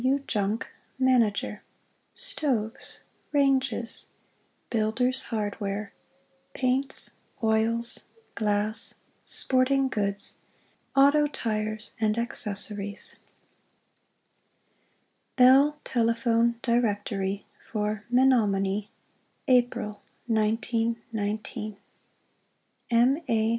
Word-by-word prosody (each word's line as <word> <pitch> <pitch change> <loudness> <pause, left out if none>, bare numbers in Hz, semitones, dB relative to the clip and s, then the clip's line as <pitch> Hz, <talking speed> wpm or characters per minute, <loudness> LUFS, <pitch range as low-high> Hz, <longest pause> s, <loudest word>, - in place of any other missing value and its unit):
W. 265 +2 +3
JUNGCK, 215 -5 -2 0.3
Mgp. 230 -5 +1 0.6
STOVES 265 - -2 0.3
RANGES 270 -4 +1 0.6
BUILDERS' 245 +4 0
HARDWARE 205 -2 -3 0.6
PAINTS, 265 +1 +3 0.3
OILS, 225 +1 +3 0.3
GLASS 210 +1 +1 0.3
SPORTING 265 +1 +3
GOODS 200 -3 +2 0.6
AUTO 285 +2 +5
TIRES 215 -5 -4
& - - -20
ACCESSORIES 210 -2 -1 2.2
Bell 270 +4 +5
Telephone 235 0 +1
Directory 205 -4 -1 0.3
FOR 210 -1 -2
MENOMONIE 210 -6 +2 0.6
APRIL, 240 -5 +1 0.3
1919 220 -1 -2 1.1
M. 245 +5 +3
A. 220 -1 +2
225 Hz, 65 wpm, -26 LUFS, 210-255 Hz, 2.2 s, AUTO